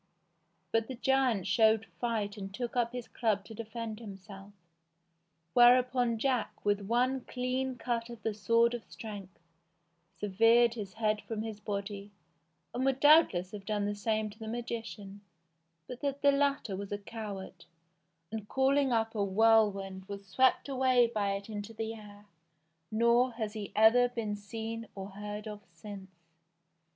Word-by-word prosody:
But 225 0 +1
the 260 - -5
giant 255 -6 +2
showed 220 +3 +4
fight 220 -4 -1
and 195 -2 -7
took 240 +4 -5
up 235 -1 +1
his 245 -1 -6
club 210 -4 -1
to 225 - -10
defend 225 0 -6
himself; 195 -2 -10 1.0
whereupon 245 -1 +5
Jack, 250 -3 -1
with 205 0 +2
one 250 +5 +1
clean 255 +1 -2
cut 235 -1 -2
of 235 -2 -10
the 220 - -1
sword 230 +3 +3
of 240 -2 -4
strength, 205 -4 -9 0.8
severed 225 +4 +4
his 205 -5 -6
head 215 -1 0
from 220 -1 -4
his 220 -2 -6
body, 200 -1 -5 0.6
and 250 - -1
would 270 0 +1
doubtless 290 - +5
have 205 -2 -8
done 205 0 -1
the 205 - -1
same 215 +1 -1
to 215 - -17
the 220 - -7
magician, 225 -4 -6 0.7
but 250 -1 -8
that 280 -1 -2
the 285 - +7
latter 280 -7 0
was 200 +1 -6
a 205 - -1
coward, 200 -4 -8 0.7
and, 220 -2 -6
calling 270 0 +2
up 225 -1 +1
a 210 -3 0
whirlwind, 200 -2 +3
was 200 -1 -7
swept 255 +10 +2
away 255 -2 +3
by 200 -2 0
it 200 0 -5
into 210 0 -6
the 225 +1 -3
air, 205 -2 -13 0.7
nor 235 +3 +3
has 220 -2 -4
he 210 -2 -6
ever 235 +3 +6
been 225 -4 -3
seen 225 +2 -6
or 195 0 -7
heard 210 +2 -6
of 210 -1 -7
since. 195 +3 -10
220 Hz, 155 wpm, -31 LUFS, 205-240 Hz, 1.0 s, the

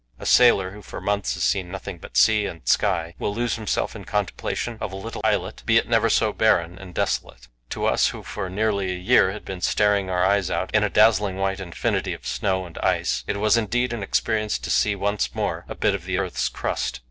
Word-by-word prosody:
A - - -10
sailor, 100 -7 +5
who 105 +2 -11
for - - -8
months 100 -1 -1
has - - -3
seen 95 -3 0
nothing 90 -1 -7
but - - -7
sea 105 -2 +4
and 80 -1 -10
sky, 85 -5 +1
will 100 - -2
lose 120 +1 0
himself 110 0 -2
in 105 - -8
contemplation 105 +4 -3
of 105 - -3
a - - -7
little 110 +4 -6
islet, 100 -4 0
be 115 0 +5
it - - +2
never 115 -1 +3
so 110 -1 +2
barren 90 -5 +2
and 90 -3 -11
desolate. 60 +1 -2 0.2
To - - -3
us, - - +3
who - - -6
for 95 - -5
nearly 100 -1 0
a - - -5
year 95 +1 +4
had 105 - -9
been 95 -2 -6
staring 100 0 +2
our 90 0 +1
eyes 100 -2 +2
out 95 - -2
in 110 -1 +4
a 105 - +1
dazzling 105 -3 +4
white 95 0 -1
infinity 85 -3 -2
of - - -15
snow 95 +10 -1
and 85 - -10
ice, - - 0
it 100 - -1
was 105 +2 +3
indeed 120 +2 0
an 115 - -4
experience 105 0 0
to 60 - -5
see 105 - +2
once 100 +1 -1
more - - -2
a - - -5
bit - - +1
of 95 -3 -5
the 95 0 -1
earth's 95 -2 -1
crust. - - -3
100 Hz, 230 wpm, -23 LUFS, 95-105 Hz, 0.2 s, sailor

